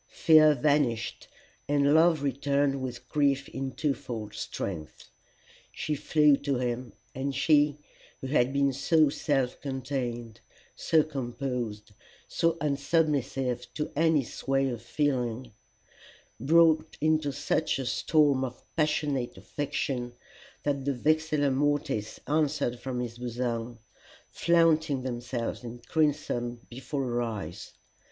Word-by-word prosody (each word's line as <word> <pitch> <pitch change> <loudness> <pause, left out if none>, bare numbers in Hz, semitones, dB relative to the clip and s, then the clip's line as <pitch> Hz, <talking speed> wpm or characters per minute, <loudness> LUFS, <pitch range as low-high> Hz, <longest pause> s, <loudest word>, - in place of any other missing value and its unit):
Fear 155 -2 +5
vanished, 135 -4 0 0.4
and 145 0 +3
love 160 -2 +4
returned 140 0 0
with 125 -1 -6
grief 140 -1 +1
in 135 -1 -4
twofold 120 -6 -3
strength. 80 -6 -6 0.6
She 155 - -3
flew 150 0 +4
to 140 -2 -1
him, 120 -2 -3 0.2
and 135 +1 -3
she 150 +1 +3 0.4
who - - -7
had 130 -2 +2
been 140 0 +2
so 155 +3 +3
self 135 -3 -1
contained, 125 -4 -4 0.4
so 160 -1 +3
composed, 125 -6 -4 0.4
so 165 -1 +1
unsubmissive 140 -4 0
to 150 - -3
any 160 -2 +3
sway 135 +2 -1
of 120 -3 -5
feeling, 125 -3 -1 0.9
broke 160 +3 +4
into 155 -1 +2
such 145 +3 0
a 135 - -3
storm 140 +1 +2
of 125 -1 -6
passionate 150 -5 0
affection 130 -4 -3 0.5
that 140 -2 -1
the 140 0 -1
vexilla 155 +1 +1
mortis 135 -6 -1
answered 145 -5 0
from 125 0 -3
his 120 -1 -6
bosom, 120 -1 -3 0.5
flaunting 160 -5 +2
themselves 120 -1 -4
in 120 0 -7
crimson 120 -4 -1
before 135 +3 -4
her 120 -1 -1
eyes. 105 -8 -5
135 Hz, 115 wpm, -28 LUFS, 120-150 Hz, 0.9 s, Fear